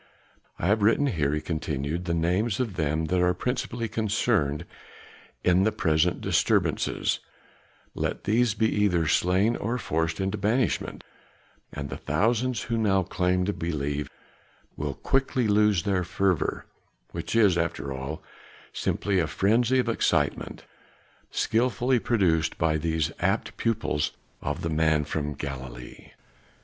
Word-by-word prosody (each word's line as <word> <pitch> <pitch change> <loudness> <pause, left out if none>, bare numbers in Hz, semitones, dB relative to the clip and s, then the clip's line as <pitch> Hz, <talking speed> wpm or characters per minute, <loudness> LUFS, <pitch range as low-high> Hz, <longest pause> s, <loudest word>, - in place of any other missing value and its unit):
I - - -3
have 105 +4 +3
written 115 +7 +4
here," 75 - 0
he 75 +1 -1
continued, 80 +1 -3
"the 85 -1 0
names 95 +6 +1
of 120 -6 -1
them 80 -1 0
that 90 +3 +1
are 90 0 +3
principally 120 -2 -2
concerned 105 -9 0 0.8
in 90 +1 +4
the 110 +3 +3
present 80 0 +1
disturbances; - - +1 0.7
let - - -3
these 115 0 +2
be 110 - +2
either 100 -6 +2
slain 95 +8 +2
or 115 +4 -2
forced 80 -6 -1
into 95 +2 -1
banishment, 110 +4 0 0.7
and 70 -1 -6
the - - -4
thousands 115 - 0
who 115 0 -1
now 95 -3 +3
claim 90 0 0
to 100 - 0
believe 75 -4 -3 0.7
will 75 -2 -3
quickly 135 -3 +1
lose 105 -3 +3
their 95 -3 +1
fervor 95 -1 0 0.5
which - - -4
is 105 -6 +5
after 80 -5 -2
all 70 +4 -6 0.5
simply 100 -2 0
a 80 - +1
frenzy 115 +9 +2
of 125 -2 +1
excitement, 80 -10 0 0.6
skilfully 125 +2 +1
produced 90 - +1
by 80 -1 +2
these 80 -1 0
apt - - 0
pupils 110 -10 -1 0.3
of 75 +4 -3
the 85 - -1
man 80 -1 +2
from 75 -1 -3
Galilee." 65 -3 -7
90 Hz, 135 wpm, -26 LUFS, 80-110 Hz, 0.8 s, is